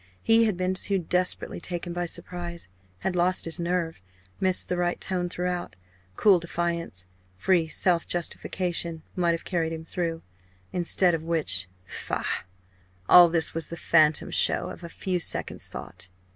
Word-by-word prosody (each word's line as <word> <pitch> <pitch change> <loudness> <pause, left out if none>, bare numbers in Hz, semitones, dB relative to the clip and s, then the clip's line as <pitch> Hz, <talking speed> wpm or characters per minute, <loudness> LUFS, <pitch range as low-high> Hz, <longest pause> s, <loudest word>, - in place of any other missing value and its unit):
He 225 0 +5
had 210 -5 0
been 185 0 0
too 195 +1 +1
desperately 180 +1 -1
taken 175 -1 -4
by 175 0 -2
surprise 170 - -5 0.3
had 185 - -1
lost 180 +1 +3
his 165 +1 +1
nerve 170 - -1 0.4
missed 185 -1 +3
the 180 - -1
right 175 0 0
tone 180 -2 -1
throughout. 180 - -3 0.4
Cool 200 -4 +5
defiance, 170 - -3 0.3
free 170 - +2
self 170 +1 +1
justification, 175 -1 -2
might 175 -2 +2
have 165 - -5
carried 165 -3 -1
him 160 0 -7
through. 165 -1 -3 0.5
Instead 175 0 +3
of 165 - -1
which 155 - +1 0.2
faugh! - - -3 0.6
All 175 -1 +9
this 165 -2 +1
was 165 -1 -3
the 170 - -6
phantom 155 -2 +3
show - - +3
of - - -11
a 170 - -6
few 180 +1 -2
seconds' - - -1
thought. 95 0 -9
175 Hz, 155 wpm, -26 LUFS, 165-180 Hz, 0.6 s, All